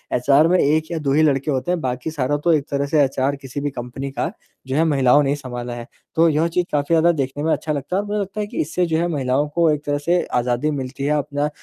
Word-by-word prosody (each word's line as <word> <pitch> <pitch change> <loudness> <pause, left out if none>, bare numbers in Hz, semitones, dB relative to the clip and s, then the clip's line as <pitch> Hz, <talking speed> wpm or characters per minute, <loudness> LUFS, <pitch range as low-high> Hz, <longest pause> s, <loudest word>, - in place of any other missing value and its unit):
HR 140 +5 +4
में 180 +2 +3
1 155 +3 +1
या 170 - -2
2 140 -2 -1
ही 155 - +4
लड़के 140 0 +1
होते 135 +6 -1
हैं, 180 - 0
बाकी 125 +4 -3
सारा 145 -1 0
तो 170 - +3
एक 145 -2 +1
तरह 140 0 0
से 145 0 +3
एचआर 135 +1 0
किसी 140 0 -7
भी 145 - -1
कंपनी 125 +2 -6
का 165 +5 -2 0.4
जो 130 - -2
है, 160 - +3
महिलाओं 145 -2 +4
ने 135 - 0
ही 145 - +1
सँभाला 125 -3 -6
है। 120 -1 -8 0.3
तो 165 +1 +5
यह 155 +2 +2
चीज़ 175 +1 0
काफ़ी 145 -1 0
ज़्यादा 165 +1 +5
देखने 145 -1 -3
में 160 - +1
अच्छा 155 - -2
लगता 145 +6 -3
है 200 - +2
और 205 - -8
मुझे 210 +1 -1
लगता 200 +1 -4
है 205 - -3
कि - - -3
इससे 175 +4 0
जो 160 -2 0
है 170 +1 +1
महिलाओं 140 -2 0
को 170 -1 +4
एक 150 0 -2
तरह 145 0 0
से 170 +5 +1 0.2
आज़ादी 125 +5 0
मिलती 135 -1 -5
है 150 +1 +2
अपना 145 +1 -1
145 Hz, 280 wpm, -21 LUFS, 135-160 Hz, 0.4 s, तो